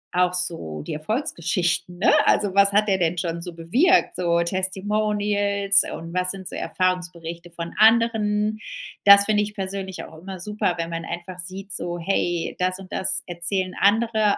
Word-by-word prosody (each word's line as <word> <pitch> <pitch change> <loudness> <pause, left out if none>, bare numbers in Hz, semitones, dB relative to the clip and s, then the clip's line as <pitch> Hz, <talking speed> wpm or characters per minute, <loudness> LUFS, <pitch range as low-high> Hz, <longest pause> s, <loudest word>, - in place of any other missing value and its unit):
auch 180 0 +2
so 165 - -2
die - - -6
Erfolgsgeschichten, 175 - -1
ne? - - +4
Also 205 -3 +2
was 200 0 +5
hat 210 +1 +2
der 190 -1 +2
denn 170 0 0
schon 170 0 -3
so 175 - -7
bewirkt? 250 - +2
So 170 -1 +1
Testimonials, 200 +2 +1
und 165 +1 -9
was 180 0 +1
sind 190 -2 -8
so - - -7
Erfahrungsberichte 175 -2 -3
von 170 0 -7
anderen? 215 -1 +3 0.5
Das 200 0 +9
finde 210 -1 +2
ich 210 0 -6
persönlich 190 -1 -5
auch 160 - -12
immer 190 +1 -8
super, 210 -1 -1
wenn 165 0 -2
man 165 0 -4
einfach 175 +2 -7
sieht 190 +2 -5
so, 175 -1 -3
hey, 175 -1 -1
das 185 0 0
und 190 -1 -12
das 190 0 0
erzählen 185 +2 -2
Andere 215 0 +2
190 Hz, 165 wpm, -23 LUFS, 175-205 Hz, 0.5 s, Das